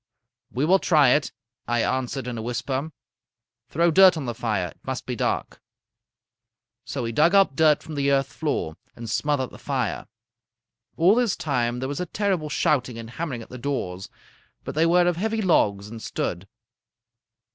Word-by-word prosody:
"'We 130 +4 0
will 190 +4 +4
try 150 -8 +4
it,' 145 +3 +2 0.4
I 120 -1 +1
answered 130 0 -2
in 125 -1 -4
a 115 - -4
whisper. 130 +5 -3 0.8
'Throw 170 +3 +2
dirt 185 +1 +7
on 145 - -4
the 120 - -3
fire. 105 -6 -2
It - - -18
must - - -4
be - - -3
dark.' - - -2 1.2
"So 135 - -4
we 115 - -2
dug 160 - +3
up 195 -8 +4
dirt 155 -1 +4
from 160 - -8
the 140 -1 0
earth 135 -1 +1
floor 140 - -2 0.2
and 115 0 -8
smothered 130 +3 -1
the - - -13
fire. 130 -6 -2 0.9
All 175 +5 +5
this 240 -3 +2
time 120 -5 -1
there 130 - -2
was 140 +1 -4
a 180 - -3
terrible 190 -6 -1
shouting 125 -5 0
and 115 0 -8
hammering 130 -5 -4
at - - -16
the 125 - -9
doors, 95 -9 -4 0.5
but - - -5
they 160 +2 +3
were 175 +1 +4
of 175 -2 +1
heavy 220 +4 -1
logs 100 - +2
and 110 +1 -9
stood. 90 -2 -4
140 Hz, 180 wpm, -24 LUFS, 120-165 Hz, 1.2 s, dirt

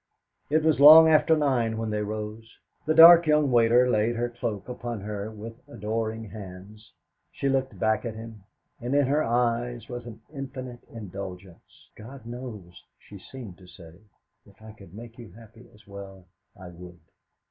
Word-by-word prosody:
It 155 +2 +1
was 160 -2 +2
long 155 +3 +10
after 160 +1 +4
nine 120 -7 0
when 110 -1 -3
they 105 0 -2
rose. 110 +2 -7 0.3
The 155 - +1
dark 170 0 +9
young 150 -2 +2
waiter 120 +1 +4
laid 115 0 0
her 120 +1 -2
cloak 115 -4 -5
upon 120 -3 -6
her 105 +1 -6
with 110 +1 -9 0.2
adoring 110 -1 -4
hands. 100 +1 -12 0.4
She 140 - -4
looked 135 -6 -1
back 110 +3 0
at 115 -3 -5
him, 110 -1 -10 0.4
and 125 +4 -3
in 145 -1 +3
her 145 +4 +1
eyes 120 -1 -1
was 120 -1 -7
an 115 -1 -11
infinite 130 -3 -8
indulgence. 95 -4 -11
'God 125 +3 -12
knows,' 115 -8 -9 0.2
she 100 - -14
seemed 110 -4 -11
to 90 - -16
say, 85 -1 -15 0.5
'if 100 - -21
I 110 - -11
could 100 -4 -16
make 115 +2 -12
you 110 -7 -12
happy 115 +2 -17
as 105 - -22
well, 100 -2 -11 0.3
I 90 - -10
would. 90 0 -13
115 Hz, 170 wpm, -25 LUFS, 105-125 Hz, 0.5 s, long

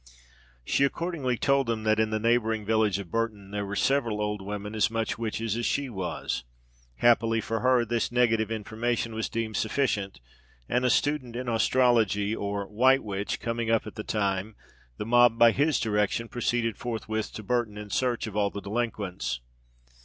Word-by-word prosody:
She - - +2
accordingly 140 -4 -1
told 140 0 +2
them 115 -2 -1
that, 110 0 +2
in 110 -1 +2
the 110 - 0
neighbouring 110 -1 +1
village 110 -2 +2
of 95 -4 -8
Burton, 110 -4 -2
there 105 -1 -3
were 100 - -4
several 120 -4 +1
old 105 -1 -2
women 105 +1 -5
as 110 0 +2
"much 115 0 -2
witches 115 -1 -2
as 120 0 -1
she 140 -3 -1
was." 90 - -3 0.5
Happily 115 - +3
for 115 +1 -2
her, 125 -1 +3
this 115 +1 -1
negative 115 -3 +2
information 115 +1 -2
was 110 0 -2
deemed 110 -1 -2
sufficient, 105 - -1 0.5
and 125 +1 +1
a 125 - +3
student 130 -2 +1
in 125 +1 -4
astrology, 115 -3 +2
or 100 -1 -3
"white 130 +7 +3
witch," 100 -1 -3
coming 115 -1 -2
up 115 -1 +2
at - - -8
the 105 - -6
time, 100 0 -1 0.4
the - - -4
mob, 120 0 +5
by 115 -1 +7
his 145 +4 +2
direction, 105 +1 0
proceeded 120 -2 -1
forthwith 110 -2 -3
to 110 - -7
Burton 120 -2 -1
in 105 -1 -8
search 125 -2 0
of 110 -2 -7
all 105 -1 +2
the 100 - -6
delinquents. 100 - -3
115 Hz, 175 wpm, -27 LUFS, 105-120 Hz, 0.5 s, by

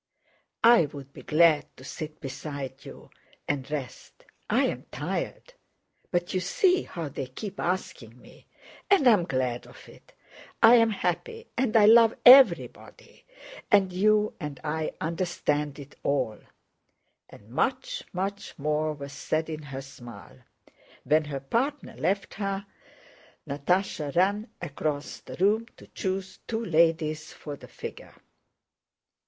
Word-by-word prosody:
"I'd 145 - +4
be - - -11
glad 155 -1 +4
to 130 - -13
sit 155 +2 -7
beside 140 -1 -7
you - - -12 0.4
and 140 -1 -2
rest: 140 -5 -7 0.2
I'm - - 0
tired; - - -4 0.6
but 175 0 -1
you 185 - +1
see 360 - +2
how 165 -3 -5
they 135 -1 -5
keep 195 - -8
asking 125 -10 -3
me, - - -18 0.4
and 375 -9 +5
I'm 210 -8 +5
glad 130 -4 -2
of - - -15
it, - - -18 0.5
I'm 230 0 +7
happy 455 - -3
and 240 -3 +2
I 210 - +7
love 225 +1 +7
everybody, 270 - +5 0.4
and 195 -5 +4
you 210 +3 +3
and 150 -5 -6
I 155 +1 -2
understand 160 -4 -1
it 140 -1 -11
all," 130 -7 -1 0.9
and 105 - -16
much, 255 - -1
much 195 +2 -4
more 155 +1 0
was 140 -1 -9
said 160 +1 -2
in 155 0 -5
her 135 -2 -7
smile. 120 -3 -12 0.6
When 155 0 +2
her 140 -2 -4
partner 265 - -2
left 195 +1 -1
her 195 0 -3 0.8
Natásha 150 0 -1
ran 200 +5 +2
across 150 -2 -4
the - - -10
room 215 +5 +2
to - - -14
choose 190 -1 -4
two 230 0 -2
ladies 160 -2 +1
for 145 -2 -8
the - - -14
figure. - - -9
165 Hz, 130 wpm, -27 LUFS, 145-205 Hz, 0.9 s, I'm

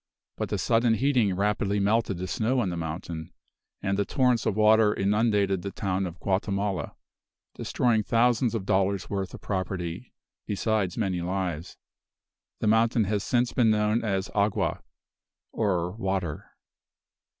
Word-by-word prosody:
But - - -3
the - - -1
sudden 115 -1 +2
heating 125 -7 +2
rapidly 100 +1 0
melted 105 -1 +1
the 90 - -4
snow 120 +7 0
on 100 - -1
the - - -3
mountain, 80 0 -5 0.5
and 95 +1 0
the - - +3
torrents 125 +1 +1
of 100 - +1
water 110 0 +5
inundated 100 -2 +1
the 100 - -4
town 95 -1 -2
of 85 0 -9
Guatemala, 100 -3 -1 0.6
destroying 120 -3 +1
thousands 120 +1 +2
of 100 -4 -3
dollars 95 -1 0
worth 95 -2 -2
of - - -12
property, 95 +1 -4 0.4
besides 105 -3 0
many 95 -5 -1
lives. 90 -2 -3 0.8
The - - +1
mountain 115 +1 +3
has 105 0 -1
since 120 0 +1
been 120 -3 +3
known 105 +1 +2
as 95 -3 -1
"Agua," 100 0 0 0.7
or 90 -5 0
water. 95 -6 -3
100 Hz, 140 wpm, -27 LUFS, 95-110 Hz, 0.8 s, water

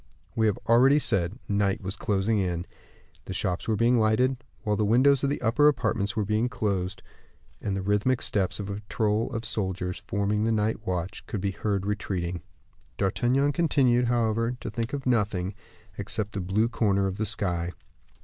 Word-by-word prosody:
We 110 -1 +3
have 105 - +1
already 130 +5 +6
said 95 - 0
night 100 +2 +1
was 95 +1 -3
closing 100 +1 0
in, 90 -2 -1 0.6
the 95 - -5
shops 95 -1 -2
were 110 - +2
being 115 +3 +3
lighted, 120 +4 +2 0.2
while 105 -1 +1
the 105 - +1
windows 130 +6 +4
of 140 - +2
the 145 - -1
upper 120 +6 +4
apartments 110 -7 +1
were 105 -2 0
being 110 +4 +1
closed, 100 -6 -2 0.6
and 100 -2 -2
the 95 - -3
rhythmic 105 +6 +1
steps 95 -1 0
of 100 -1 -4
a - - -3
patrol 105 +1 -1
of 115 0 -4
soldiers 95 -4 -2
forming 105 0 0
the 115 - +2
night 110 0 -1
watch 90 +1 -3
could 105 - -3
be 100 +1 -1
heard 100 -1 -2
retreating. 90 -4 -2 0.6
D'Artagnan 125 +8 +2
continued, 135 -7 +3
however, 115 0 +1
to - - -5
think 115 +3 -3
of 140 -2 -3
nothing, 105 -6 +1 0.5
except 105 +1 -3
the 100 - -3
blue 100 +5 +1
corner 100 -4 +1
of 95 0 -2
the 110 - -1
sky. 90 -5 -2
105 Hz, 180 wpm, -27 LUFS, 95-115 Hz, 0.6 s, already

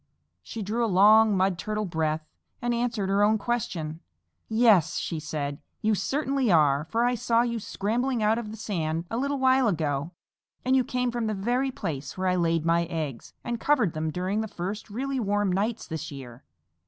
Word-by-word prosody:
She 225 - -6
drew 225 +5 -1
a - - +2
long 210 +2 +6
Mud 185 -1 +1
Turtle 215 +2 -2
breath 160 -3 -1 0.3
and 240 0 -1
answered 235 -4 -1
her 200 +1 +2
own 215 +1 +4
question. 180 -9 -3 0.5
"Yes," 220 -8 +4
she 165 - -3
said, 145 -2 -4 0.2
"you 220 0 +3
certainly 265 +4 0
are, 150 -3 +4
for 230 +1 +1
I 245 - +2
saw 230 0 +2
you 235 -1 -2
scrambling 230 +4 -1
out 220 +2 +3
of 225 -3 -6
the 220 - -8
sand 165 -6 -2
a 225 - -1
little 280 +2 0
while 260 -1 +4
ago, 155 -5 -1 0.6
and 260 +1 +3
you 260 - +4
came 250 0 -1
from 235 -2 -2
the 215 - -1
very 245 +7 0
place 145 - -5
where 185 0 -1
I 180 - +2
laid 165 -2 +1
my 170 0 +3
eggs 155 -7 -5
and 235 -1 -3
covered 250 - +2
them 155 0 -2
during 185 +6 -1
the 220 - -3
first 200 +3 -5
really 265 +5 -2
warm 205 -3 +1
nights 215 +5 -1
this 160 -1 -5
year. 130 -2 -10
205 Hz, 190 wpm, -27 LUFS, 165-235 Hz, 0.6 s, long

